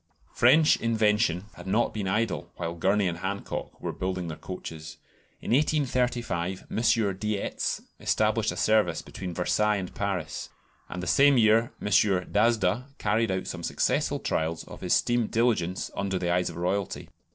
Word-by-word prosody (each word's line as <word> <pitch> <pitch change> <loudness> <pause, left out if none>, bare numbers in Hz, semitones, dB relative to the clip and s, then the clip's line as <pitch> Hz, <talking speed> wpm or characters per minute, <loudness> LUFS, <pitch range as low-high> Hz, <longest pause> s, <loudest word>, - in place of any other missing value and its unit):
French 150 +6 +5
invention 105 -5 +1
had - - -11
not 110 +5 +1
been 105 -3 -3
idle 95 -5 -1
while 85 -1 -4
Gurney 95 +4 +1
and 85 -1 -3
Hancock 100 +2 -5
were - - -3
building 90 -2 -3
their 80 - -5
coaches. 80 -4 -8 0.4
In - - -4
1835 125 - 0
M. 110 -4 +1
Dietz 105 -1 -2 0.2
established 110 0 +1
a - - -7
service 105 -6 +2
between 90 -3 -7
Versailles 105 +4 +1
and 95 -3 -4
Paris, 95 -6 -3 0.4
and 90 - -5
the - - -3
same 140 +9 +5
year 115 +1 +4
M. - - -5
D'Asda 105 +3 +2
carried 110 +2 +1
out 95 0 -1
some 90 - -5
successful - - 0
trials 80 +1 -2
of - - -12
his - - +2
steam 120 -2 +1
"diligence" 110 -6 0
under 95 -1 -1
the 85 -1 0
eyes 90 0 +1
of 85 - -9
Royalty. 90 +3 -2
100 Hz, 155 wpm, -27 LUFS, 90-115 Hz, 0.4 s, French